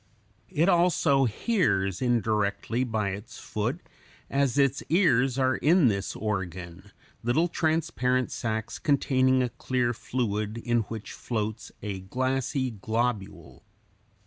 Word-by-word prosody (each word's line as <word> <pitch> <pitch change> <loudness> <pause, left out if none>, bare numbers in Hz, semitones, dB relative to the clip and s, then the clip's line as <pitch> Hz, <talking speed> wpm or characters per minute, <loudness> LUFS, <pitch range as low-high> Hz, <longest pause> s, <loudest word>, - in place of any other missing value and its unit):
It 165 -1 +2
also 170 -6 +4
hears 105 - 0
indirectly 110 -1 0
by 110 -5 -1
its 100 +5 -7
foot, 120 +11 -3 0.5
as 140 -1 +1
its 140 0 +3
ears 135 -7 +3
are 130 -1 +2
in 160 -3 +4
this 100 -3 -2
organ, 95 -2 -4 0.3
little 125 +9 +2
transparent 155 -7 0
sacs 110 -1 -3
containing 130 -3 +3
a 125 - -1
clear 125 -1 -1
fluid 110 -3 -2
in 120 0 +1
which 110 -2 -6
floats 110 -2 -4
a 100 -3 -3
glassy 130 +6 -1
globule. 110 0 -3
120 Hz, 115 wpm, -27 LUFS, 105-135 Hz, 0.5 s, also